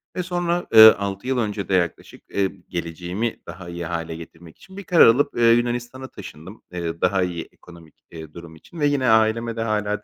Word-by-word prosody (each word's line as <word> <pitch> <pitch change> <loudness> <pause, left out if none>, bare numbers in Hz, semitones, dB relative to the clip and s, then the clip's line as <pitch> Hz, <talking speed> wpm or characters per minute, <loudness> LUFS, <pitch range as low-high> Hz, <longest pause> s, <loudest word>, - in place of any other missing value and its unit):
Ve 180 - -2
sonra, 175 -1 -2
ııı, 110 0 +10
6 100 +3 -5
yıl 130 -1 0
önce 105 -4 -3
de - - -1
yaklaşık, 85 -2 -2
eee, 100 -1 0 0.2
geleceğimi 90 +6 -4
daha 90 -2 -9
iyi 85 0 -6
hâle 85 0 -4
getirmek 80 0 -13
için 190 0 -16
bir 200 - -7
karar 170 -6 +5
alıp, 140 +5 +2
eee, 115 -1 +5
Yunanistan'a 120 +2 -1
taşındım, 95 - -12
eee, 85 -2 -5
daha 95 -2 +2
iyi 85 -2 -5
ekonomik, 85 -3 -17 0.2
eee, 80 -2 -10
durum 85 -2 -11
için 160 - -14
ve 145 - +2
yine 140 -3 0
aileme 110 +1 +2
de 115 - -4
hâlâ 105 -2 -2
105 Hz, 195 wpm, -22 LUFS, 85-120 Hz, 0.2 s, ııı